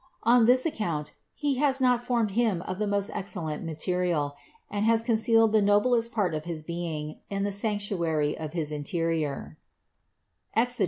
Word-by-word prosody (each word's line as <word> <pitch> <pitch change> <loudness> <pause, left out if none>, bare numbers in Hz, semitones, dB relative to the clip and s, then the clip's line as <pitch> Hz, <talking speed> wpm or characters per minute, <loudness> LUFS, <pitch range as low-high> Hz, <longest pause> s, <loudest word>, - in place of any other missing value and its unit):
On 235 0 +5
this 255 +2 +4
account 170 - -2 0.2
He 285 -3 0
has 275 -2 +2
not 250 -2 +3
formed 235 -4 0
him 210 -5 +1
of 185 +1 -5
the 210 - 0
most 200 0 0
excellent 170 -6 -4
material, 165 -3 -1 0.3
and 205 0 -2
has 225 0 +3
concealed 225 -1 +3
the 215 -1 +4
noblest 230 +4 +3
part 205 -8 0
of 155 0 -4
his 165 -3 -5
being 160 -2 -5
in 195 0 -2
the 205 - -1
sanctuary 195 -8 -1
of 155 -1 -6
his 155 -3 -2
interior 150 - -2 1.0
(Exod. 245 +2 +1
200 Hz, 160 wpm, -27 LUFS, 160-230 Hz, 1.0 s, On